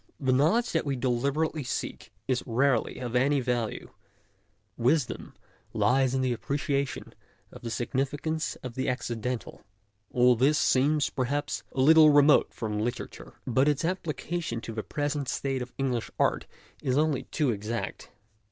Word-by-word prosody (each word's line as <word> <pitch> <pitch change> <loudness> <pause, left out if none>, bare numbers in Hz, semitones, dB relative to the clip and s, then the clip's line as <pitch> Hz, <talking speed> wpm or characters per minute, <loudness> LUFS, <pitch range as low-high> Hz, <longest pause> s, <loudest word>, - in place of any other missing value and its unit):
The 130 -2 +1
knowledge 165 - +3
that 165 - +1
we 140 -2 -1
deliber 135 +5 +1
ately 155 -2 -6
seek 125 - -5 0.2
is 130 -2 +1
rarely 125 0 +1
of 125 -1 -5
any 140 +3 +3
value; 120 -3 -2 0.8
wisdom 125 +2 0 0.4
lies 130 +1 +2
in 130 0 +1
appreciation 140 +3 -2 0.4
of - - -12
the 120 - -5
significance 140 +7 -2
of 125 -2 -6
the 130 +2 -1
accidental. 125 -1 -4 0.5
All 125 0 +4
this 140 +6 +3
seems, 145 +3 +2
perhaps, 140 +3 -2
a 130 - 0
little 155 +2 +8
remote 145 0 +5
from 105 -2 -3
literature, 120 +3 -5
but 130 +2 +2
its 150 +1 +1
application 170 -6 -3
to 115 - -7
the 110 - -3
present 145 +2 -2
state 135 -2 -2
of 125 0 -6
English 130 -4 -1
art - - +1 0.3
is 130 0 0
only 150 -3 +1
too 145 -5 0
exact. 110 +2 -4
130 Hz, 145 wpm, -28 LUFS, 120-145 Hz, 0.8 s, little